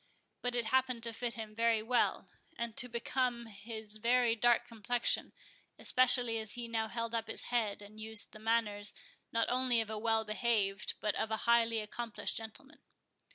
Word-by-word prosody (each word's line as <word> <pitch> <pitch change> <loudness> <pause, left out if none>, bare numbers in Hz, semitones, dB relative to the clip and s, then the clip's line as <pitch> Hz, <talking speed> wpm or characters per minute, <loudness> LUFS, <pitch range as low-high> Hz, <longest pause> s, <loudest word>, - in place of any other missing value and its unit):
But 245 0 -1
it 240 -1 0
happened 255 0 +1
to 230 -1 +1
fit 235 +1 -3
him 220 -2 -6
very 230 -1 +2
well, 245 +2 +1 0.3
and 235 -2 -3
to 250 - -1
become 240 0 -1
his 215 0 -3
very 235 +1 +3
dark 240 +1 +3
complexion, 230 +1 -1 0.5
especially 245 -2 +3
as 220 -1 -5
he 240 -1 -5
now 225 -1 -1
held 230 0 -3
up 225 -1 -1
his 225 - -4
head, 210 -4 0
and 210 +1 -13
used 220 -1 +1
the 215 - -11
manners, 215 -2 0 0.4
not 230 0 +1
only 250 -1 +3
of 220 -1 -2
a 215 - -3
well 225 0 +2
behaved 215 -2 0
but 210 -1 +1
of 220 - -2
a 220 - 0
highly 230 -1 +4
accomplished 230 +1 -3
gentleman. 225 +6 -8
230 Hz, 175 wpm, -34 LUFS, 220-240 Hz, 0.5 s, highly